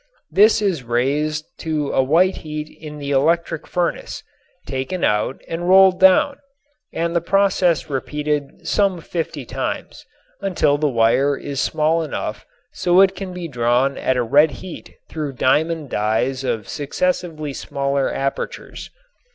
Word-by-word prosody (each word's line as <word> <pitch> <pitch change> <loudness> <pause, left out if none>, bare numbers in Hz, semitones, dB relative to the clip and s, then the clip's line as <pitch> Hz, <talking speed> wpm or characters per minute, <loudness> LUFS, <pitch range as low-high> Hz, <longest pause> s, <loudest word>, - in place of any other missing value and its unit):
This 215 +2 +5
is 185 -8 0
raised 145 +6 -1
to 155 -3 -2
a - - +3
white 170 +8 +3
heat 155 -1 -6
in 150 -1 -8
the 145 -1 -5
electric 165 +3 +1
furnace, 175 -1 -2 0.4
taken 135 +7 -3
out 105 +5 +1
and 175 +2 -3
rolled 190 -1 +6
down, 235 +10 +5 0.5
and 170 +1 -2
the 170 - +2
process 180 -4 +2
repeated 150 +1 -3
some 195 -3 +1
fifty 160 -4 -4
times, - - -5 0.4
until 175 -7 +1
the 150 -1 +2
wire 130 +4 +2
is 140 -2 -4
small 160 +2 +1
enough 155 - -5 0.3
so 180 +1 +3
it 195 0 +5
can 195 -2 -6
be 180 -1 -6
drawn 125 0 +1
at 130 - 0
a 125 - +2
red 145 +7 +5 0.2
heat 180 - -10
through 150 -3 -4
diamond 150 +3 +1
dies 110 +5 0
of 110 -5 -2
successively 155 -1 -2
smaller 140 0 -1
apertures. 135 0 -4
150 Hz, 140 wpm, -20 LUFS, 135-175 Hz, 0.5 s, rolled